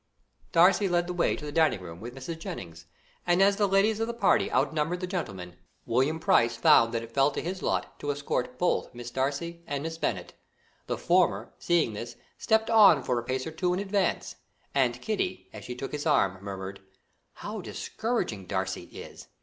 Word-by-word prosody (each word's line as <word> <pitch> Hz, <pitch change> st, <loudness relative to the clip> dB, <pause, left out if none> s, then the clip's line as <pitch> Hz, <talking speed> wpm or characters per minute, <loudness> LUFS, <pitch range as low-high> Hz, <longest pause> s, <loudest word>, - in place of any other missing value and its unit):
Darcy 185 Hz, +4 st, +5 dB
led 175 Hz, 0 st, +2 dB
the 180 Hz, -, -4 dB
way 175 Hz, -, +1 dB
to 150 Hz, -, -8 dB
the 145 Hz, -, -5 dB
dining 155 Hz, -9 st, +2 dB
room 85 Hz, -2 st, -9 dB
with 120 Hz, +3 st, -8 dB
Mrs. 150 Hz, +5 st, -6 dB
Jennings, 85 Hz, -, -8 dB, 0.4 s
and 175 Hz, +1 st, +3 dB
as 200 Hz, +1 st, +4 dB
the 205 Hz, -1 st, +3 dB
ladies 200 Hz, +3 st, +2 dB
of 225 Hz, -, 0 dB
the 235 Hz, -, -4 dB
party 210 Hz, -4 st, +3 dB
out 135 Hz, +5 st, +1 dB
numbered 160 Hz, +3 st, -1 dB
the 185 Hz, -, -3 dB
gentlemen, 95 Hz, -, -5 dB, 0.3 s
William 135 Hz, +7 st, +1 dB
Price 140 Hz, -10 st, +3 dB
found 115 Hz, 0 st, +5 dB
that 115 Hz, -1 st, -2 dB
it 115 Hz, -, -10 dB
fell 135 Hz, +3 st, +3 dB
to 145 Hz, -, -4 dB
his 185 Hz, +2 st, -4 dB
lot -, -, -2 dB
to 145 Hz, -, -4 dB
escort 140 Hz, -3 st, -2 dB
both 175 Hz, -7 st, 0 dB
Miss 120 Hz, 0 st, -7 dB
Darcy 145 Hz, +6 st, -2 dB
and 140 Hz, 0 st, -3 dB
Miss 165 Hz, 0 st, -5 dB
Bennet. -, -, -2 dB, 0.5 s
The -, -, -2 dB
former, 180 Hz, 0 st, +1 dB
seeing 170 Hz, -10 st, +1 dB
this, 120 Hz, +3 st, -7 dB, 0.2 s
stepped 220 Hz, 0 st, +2 dB
on 200 Hz, -, +7 dB
for 125 Hz, -1 st, 0 dB
a -, -, -6 dB
pace 130 Hz, +2 st, -2 dB
or 160 Hz, -, -5 dB
two 180 Hz, +3 st, 0 dB
in -, -, -2 dB
advance, 200 Hz, -2 st, -1 dB, 0.4 s
and 125 Hz, -3 st, +1 dB
Kitty, 190 Hz, -, -3 dB
as 105 Hz, -2 st, -9 dB
she 125 Hz, -, -6 dB
took 135 Hz, +2 st, -6 dB
his 150 Hz, +2 st, -3 dB
arm, 95 Hz, -10 st, +2 dB
murmured: 95 Hz, -1 st, -6 dB, 0.5 s
"How -, -, -6 dB
discouraging 165 Hz, -, -3 dB
Darcy 95 Hz, 0 st, -2 dB
is! -, -, -11 dB
150 Hz, 200 wpm, -28 LUFS, 120-180 Hz, 0.5 s, on